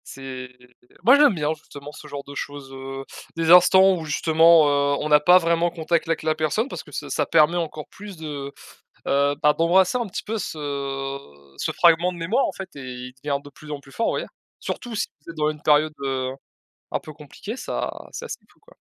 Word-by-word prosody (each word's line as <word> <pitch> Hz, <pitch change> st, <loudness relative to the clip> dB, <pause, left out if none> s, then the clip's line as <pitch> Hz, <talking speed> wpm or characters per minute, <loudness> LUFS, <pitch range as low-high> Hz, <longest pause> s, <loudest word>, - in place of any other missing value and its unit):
C'est 130 Hz, -1 st, -8 dB, 0.5 s
moi 250 Hz, +7 st, +7 dB
j'aime 290 Hz, -7 st, +5 dB
bien, 150 Hz, -1 st, 0 dB
justement, 145 Hz, -2 st, -11 dB
ce 150 Hz, -, -12 dB
genre 145 Hz, -1 st, -6 dB
de 140 Hz, -, -10 dB
choses, 140 Hz, -1 st, -7 dB
heu, 135 Hz, 0 st, -7 dB, 0.3 s
des 165 Hz, 0 st, +1 dB
instants 190 Hz, +2 st, +7 dB
où 160 Hz, -, -6 dB
justement, 160 Hz, +1 st, +5 dB
heu, 140 Hz, 0 st, +2 dB
on 150 Hz, -, -3 dB
a 150 Hz, -, +8 dB
pas 180 Hz, +5 st, +6 dB
vraiment 170 Hz, 0 st, +2 dB
contact 165 Hz, 0 st, -1 dB
avec 165 Hz, -1 st, -1 dB
la 155 Hz, 0 st, +2 dB
personne. 155 Hz, -, 0 dB
Parce -, -, -7 dB
que -, -, -16 dB
ça -, -, -5 dB
ça -, -, 0 dB
permet 155 Hz, +3 st, +4 dB
encore 155 Hz, -3 st, -4 dB
plus 200 Hz, -2 st, -11 dB
de, 145 Hz, -3 st, -6 dB, 0.6 s
heu, 140 Hz, +1 st, +2 dB
bah, 150 Hz, -1 st, +5 dB
d'embrasser 180 Hz, +7 st, +3 dB
un 240 Hz, -, -2 dB
petit 200 Hz, -, -5 dB
peu 225 Hz, +1 st, -3 dB
ce 140 Hz, -4 st, -4 dB, 0.4 s
ce -, -, -1 dB
fragment 170 Hz, +1 st, +4 dB
de 175 Hz, -, -10 dB
mémoire 185 Hz, +11 st, +1 dB
en -, -, -3 dB
fait 195 Hz, -, -8 dB
et -, -, -7 dB, 0.3 s
il -, -, -15 dB
devient 140 Hz, -1 st, 0 dB
de 145 Hz, -, -13 dB
plus 150 Hz, +2 st, -14 dB
en 145 Hz, -, -5 dB
plus 140 Hz, -, -17 dB
fort, 230 Hz, -, -1 dB
vous -, -, +1 dB
voyez? -, -, -3 dB, 0.3 s
Surtout 240 Hz, -2 st, -5 dB
si 210 Hz, -, -1 dB, 0.2 s
c'est 165 Hz, -, -10 dB
dans 150 Hz, 0 st, +1 dB
une 150 Hz, -1 st, -8 dB
période, 155 Hz, +1 st, +3 dB
heu, 130 Hz, -1 st, -1 dB, 0.6 s
un -, -, -1 dB
peu 155 Hz, -, -10 dB
compliquée, 155 Hz, -, -8 dB
ça -, -, -3 dB, 0.2 s
c'est -, -, -6 dB
assez -, -, -6 dB
fou -, -, -31 dB
quoi. -, -, -22 dB
155 Hz, 220 wpm, -23 LUFS, 140-175 Hz, 0.6 s, a